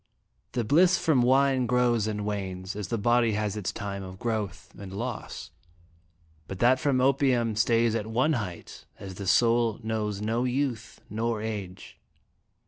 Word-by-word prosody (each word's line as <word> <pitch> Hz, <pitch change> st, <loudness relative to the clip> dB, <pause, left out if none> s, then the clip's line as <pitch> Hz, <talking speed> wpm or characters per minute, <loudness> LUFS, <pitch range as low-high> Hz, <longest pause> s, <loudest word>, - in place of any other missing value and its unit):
" -, -, -45 dB
The 120 Hz, -, 0 dB
bliss 175 Hz, -, +4 dB
from 150 Hz, -6 st, +2 dB
wine 130 Hz, 0 st, +3 dB
grows 120 Hz, -3 st, +2 dB
and 105 Hz, -1 st, -3 dB
wanes 95 Hz, -2 st, -4 dB
as 105 Hz, -2 st, -4 dB
the 115 Hz, -, -2 dB
body 120 Hz, +1 st, +2 dB
has 105 Hz, -1 st, -1 dB
its 105 Hz, -3 st, -3 dB
time 100 Hz, -2 st, -5 dB
of 95 Hz, -1 st, -9 dB
growth 110 Hz, -4 st, -4 dB
and 100 Hz, -2 st, -9 dB
loss, 115 Hz, +4 st, -6 dB, 1.0 s
but 95 Hz, -, -6 dB
that 125 Hz, +5 st, +4 dB
from 140 Hz, -3 st, +1 dB
opium 130 Hz, -4 st, +2 dB
stays 115 Hz, +1 st, +2 dB
at 110 Hz, -2 st, -2 dB
one 130 Hz, +8 st, +1 dB
height, 100 Hz, -, -6 dB
as 95 Hz, -1 st, -8 dB
the 95 Hz, +1 st, -7 dB
soul 115 Hz, +1 st, +3 dB
knows 110 Hz, -2 st, -2 dB
no 115 Hz, +3 st, -1 dB
youth 125 Hz, -3 st, -2 dB
nor 115 Hz, +1 st, -2 dB
age." 105 Hz, -4 st, -6 dB
115 Hz, 160 wpm, -27 LUFS, 105-125 Hz, 1.0 s, bliss